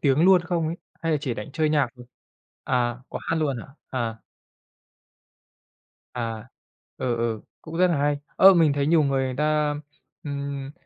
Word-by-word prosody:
tiếng 140 -2 +3
luôn 185 -1 +7
không 175 -2 -1
ấy? 165 +2 -3 0.3
Hay 165 -1 +1
là 150 - +2
chỉ 130 -6 -2
đánh 105 +5 -7
chơi 155 +1 +1
nhạc 145 -4 +3
thôi? 125 0 -12 0.6
À, 120 -1 0
có - - -5
hát - - -1
luôn 145 -5 0
hả? - - -10 0.2
À. 115 -3 -2 2.0
À, 115 -3 -4 0.5
ờ, 120 -2 -1
ờ, 115 -2 -1 0.2
cũng 160 0 -7
rất 185 - +6
là 170 -4 +1
hay! 145 0 +1 0.2
Ơ, 195 0 +9
mình 160 -4 +4
thấy 140 0 0
nhiều 160 0 +4
người 135 -2 +1
người 130 -1 -2
ta, 150 0 +1 0.5
ừm, 140 -1 -4
140 Hz, 175 wpm, -25 LUFS, 125-155 Hz, 2.0 s, Ơ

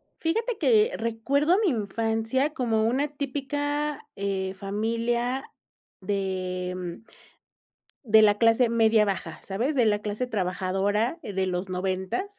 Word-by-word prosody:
Fíjate 450 +7 -1
que 445 0 +4
recuerdo 275 +9 +1
mi 390 - +4
infancia 225 +5 -1
como 225 -6 +1
una 260 +6 +1
típica, 290 +1 -2
eh, 195 -1 -2
familia 230 +6 -1 0.6
de, 185 -2 -2
mm, 180 +1 -6 1.0
de 220 -3 +6
la 205 -1 +5
clase 230 +2 +4
media 225 -1 +4
baja, 195 -3 -3
¿sabes? 235 +10 -2
De 245 -4 +3
la 210 -1 +2
clase 210 +4 -3
trabajadora 200 - -1
de 190 -2 -1
los 180 +1 -2
noventas. 190 - -2
225 Hz, 120 wpm, -26 LUFS, 195-265 Hz, 1.0 s, de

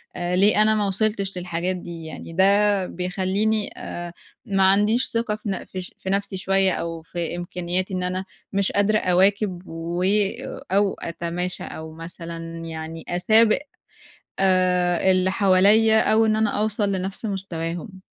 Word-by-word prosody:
آآ 175 0 -2
ليه 205 +2 +4
أنا 215 0 +3
ما 205 -1 +1
وصلتش 200 -1 -1
للحاجات 180 +1 -2
دي 170 -2 -8
يعني؟ 165 +1 -8
ده 200 +1 +3
بيخلّيني 190 +4 -1
آآ 175 0 -6 0.3
ما 195 -1 +1
عنديش 210 +6 +4
ثقة 230 -2 -1
في 210 -1 -6
ن 190 - -3
في 185 - -6
ش 180 - -11
في 190 - -6
نفْسي 200 -1 -1
شوية، 195 0 +2
أو 165 -1 -4
في 170 0 -4
إمكانياتي 180 +2 -3
إن 180 - -2
أنا 185 +1 -2 0.3
مش 195 0 +1
قادرة 210 +1 +2
أواكب 185 0 +2
و 170 +2 -4 0.7
أو 200 0 +3
أتماشى، 170 +2 -4
أو 160 0 -8
مثلًا 165 0 -7
يعني 160 0 -7
أسابق 215 +5 +4 0.8
آآ 185 -1 +3
اللي 185 0 +2
حواليّا، 205 +3 +5
أو 220 0 +4
إن 215 0 +2
أنا 220 -1 +2
أوصل 210 -1 0
لنفْس 190 +4 -3
مستواهم. 185 -1 -5
185 Hz, 150 wpm, -23 LUFS, 175-205 Hz, 0.8 s, حواليّا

